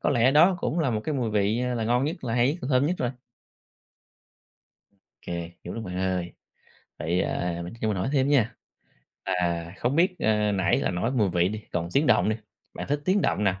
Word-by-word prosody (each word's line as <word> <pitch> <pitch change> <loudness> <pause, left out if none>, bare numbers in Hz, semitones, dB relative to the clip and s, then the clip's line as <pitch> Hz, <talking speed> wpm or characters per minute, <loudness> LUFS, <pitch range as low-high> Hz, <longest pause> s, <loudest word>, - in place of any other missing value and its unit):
có - - +1
lẽ 120 -1 +4
đó 170 +6 +5
cũng 170 - -1
là 150 -6 +1
một 110 -2 -1
cái 155 - -1
mùi 125 -5 -1
vị 105 +3 +1
là 115 - -1
ngon 120 +3 +2
nhất 155 -1 -4
là 115 -1 -1
hay 125 +2 +3
nhất, 170 - -7
là - - -3
thơm 135 +1 +3
nhất 180 - +1
rồi. 125 -1 0 2.1
Kê, 85 -1 -5
hiểu 90 - -6
lắm 115 -1 -5
bạn 90 -1 -5
ơi. 90 -2 -1 0.7
Vậy, 85 +4 0
ờ, 85 -1 -2
mình 85 - -7
cho 110 - +1
mình 105 -3 0
hỏi 95 - -1
thêm 135 -1 +2
nha, 130 -6 +2 0.7
là 85 -1 -1
không 125 +5 0
biết, 185 +2 +3
ờ, 105 -1 +2
nãy 95 -2 +2
là - - 0
nói 90 +7 -1
mùi 110 -7 +2
vị 90 +1 +2
đi, 110 +1 -5
còn 85 -1 -1
tiếng 145 +2 +3
động - - +4
đi, 110 - +1 0.4
bạn - - -5
thích 145 +1 0
tiếng 195 +2 +3
động 105 - +1
nào? 95 -1 +1
110 Hz, 225 wpm, -26 LUFS, 90-135 Hz, 2.1 s, đó